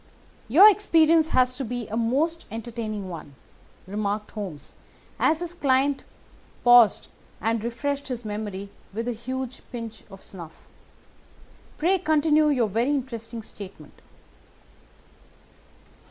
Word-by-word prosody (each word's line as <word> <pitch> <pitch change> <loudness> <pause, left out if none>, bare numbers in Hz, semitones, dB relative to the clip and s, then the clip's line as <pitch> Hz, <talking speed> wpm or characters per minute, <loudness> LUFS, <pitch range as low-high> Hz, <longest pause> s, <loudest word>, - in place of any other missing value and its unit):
"Your 330 - +8
experience 330 -6 +4
has 255 -4 +2
been 245 -3 -4
a - - -2
most 280 +9 0
entertaining 220 -2 -5
one," 160 -5 -9 0.5
remarked 205 +1 -3
Holmes 190 -9 -7 0.5
as 320 +2 +2
his 350 -1 -4
client 275 -3 +1 0.6
paused 240 -4 +6 0.3
and 225 +1 -1
refreshed 280 +4 -3
his 245 -3 -5
memory 205 -2 -5 0.2
with 230 +2 -3
a - - 0
huge 255 +2 -5
pinch 230 -3 -7
of 195 -1 -13
snuff. 170 -4 -11 1.1
"Pray 370 +4 +2
continue 310 -2 +3
your 250 -6 +2
very 230 +6 0
interesting 235 -5 -3
statement." 195 -8 -11
240 Hz, 110 wpm, -25 LUFS, 215-285 Hz, 1.1 s, Your